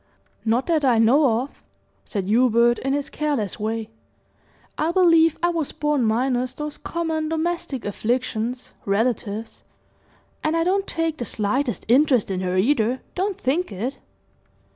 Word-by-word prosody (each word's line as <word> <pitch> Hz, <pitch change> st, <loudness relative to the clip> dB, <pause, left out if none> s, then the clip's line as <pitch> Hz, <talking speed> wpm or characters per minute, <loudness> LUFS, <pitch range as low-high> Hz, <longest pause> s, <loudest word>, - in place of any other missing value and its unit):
"Not 235 Hz, +3 st, +1 dB
that 320 Hz, -3 st, +1 dB
I 250 Hz, -4 st, +4 dB
know 235 Hz, +1 st, +4 dB
of," 280 Hz, -, -13 dB, 0.4 s
said 200 Hz, -4 st, -3 dB
Hubert, 235 Hz, +2 st, +3 dB
in 270 Hz, +1 st, -1 dB
his 285 Hz, 0 st, -1 dB
careless 285 Hz, -11 st, -2 dB
way. 220 Hz, +1 st, -3 dB, 0.8 s
"I 320 Hz, +2 st, 0 dB
believe 330 Hz, -3 st, +4 dB
I 345 Hz, -, +4 dB
was 330 Hz, -4 st, -2 dB
born 295 Hz, -3 st, 0 dB
minus 250 Hz, +3 st, 0 dB
those 300 Hz, +1 st, -5 dB
common 320 Hz, -2 st, -2 dB
domestic 320 Hz, -5 st, -2 dB
afflictions, 235 Hz, +3 st, -2 dB
relatives; 220 Hz, +1 st, -1 dB, 0.8 s
and 310 Hz, +2 st, +1 dB
I 330 Hz, -, +2 dB
don't 390 Hz, +3 st, +1 dB
take 330 Hz, -1 st, -1 dB
the 240 Hz, -, -2 dB
slightest 235 Hz, +1 st, -1 dB
interest 255 Hz, -3 st, +3 dB
in 185 Hz, -1 st, -2 dB
her, 185 Hz, 0 st, -1 dB
either; 240 Hz, +3 st, +2 dB
don't 385 Hz, +1 st, -1 dB
think 310 Hz, +6 st, 0 dB
it!" 225 Hz, +8 st, -4 dB
255 Hz, 140 wpm, -23 LUFS, 225-310 Hz, 0.8 s, I